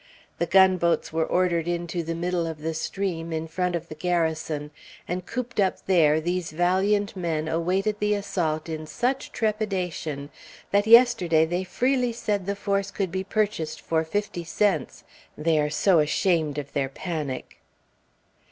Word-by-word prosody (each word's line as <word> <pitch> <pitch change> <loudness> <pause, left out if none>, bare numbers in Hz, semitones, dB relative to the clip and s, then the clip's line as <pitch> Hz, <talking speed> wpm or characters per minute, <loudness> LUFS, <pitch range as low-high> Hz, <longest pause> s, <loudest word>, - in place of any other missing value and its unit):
The 170 - 0
gunboats 180 -3 +3
were 160 0 +1
ordered 175 -2 +1
into 175 0 -2
the 165 0 -4
middle 175 0 -1
of 160 -2 -6
the 160 +1 -2
stream, 170 0 -3
in 160 0 -3
front 180 +2 -1
of 170 0 -4
the - - -7
Garrison; 160 -3 -1 0.4
and 180 +1 -4
cooped 240 -2 -4
up 190 -2 +1
there, 160 -5 +4
these 175 +1 -2
valiant 190 +5 +1
men 165 -4 -2
awaited 190 +6 0
the 210 0 +2
assault 170 -6 -2
in 155 -1 -5
such 255 - -1
trepidation 185 -9 -2 0.4
that 205 +1 +3
yesterday 225 -9 +6
they 175 +3 -2
freely 250 +6 0
said 205 -4 -2
the 200 - 0
force 200 0 -1
could 195 -3 -3
be 190 +1 -2
purchased 200 -6 -1
for 160 -1 0
fifty 175 +1 -3
cents, 165 -2 0 0.3
they 155 0 +2
are 150 0 +1
so 170 +3 +3
ashamed 155 -1 +1
of 140 -1 -5
their 135 -1 0
panic. 150 -3 -5
175 Hz, 155 wpm, -25 LUFS, 160-200 Hz, 0.4 s, yesterday